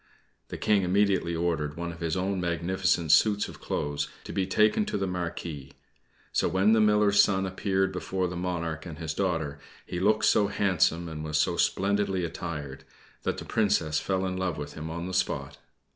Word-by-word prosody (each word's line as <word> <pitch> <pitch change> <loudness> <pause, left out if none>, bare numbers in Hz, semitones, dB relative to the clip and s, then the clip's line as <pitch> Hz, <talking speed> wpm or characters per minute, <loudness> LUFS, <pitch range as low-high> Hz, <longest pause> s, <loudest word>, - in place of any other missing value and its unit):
The - - -6
King 105 -2 +3
immediately 95 -2 +2
ordered 80 -3 -1
one 85 0 -3
of 85 - -11
his 85 0 -1
own 95 0 -1
magnificent 85 -1 0
suits 105 +3 +4
of - - -12
clothes 70 0 -2
to - - -7
be 95 -1 0
taken 105 - +3
to - - -1
the 95 - -1
Marquis; 85 -6 -5 0.6
so - - +1
when 95 +4 +3
the 110 - +4
Miller's 105 -1 +5
son 95 -1 +2
appeared 95 0 0
before 95 -1 -2
the 90 - -5
monarch 85 -3 -3
and 80 -3 -8
his 80 0 -4
daughter, 80 -6 -1 0.3
he 90 - -4
looked 105 +3 +3
so 105 - +4
handsome, 90 -4 +1
and 75 -1 -6
was 75 -1 -1
so - - +2
splendidly 100 -2 +1
attired, 75 -5 -6 0.4
that - - -2
the - - -7
Princess 90 -8 +1
fell 95 -1 -1
in 95 0 -2
love 95 -3 -1
with 75 0 -6
him 80 +1 -6
on 85 +1 -4
the 95 - -5
spot. 70 -6 -1
90 Hz, 190 wpm, -28 LUFS, 80-95 Hz, 0.6 s, Miller's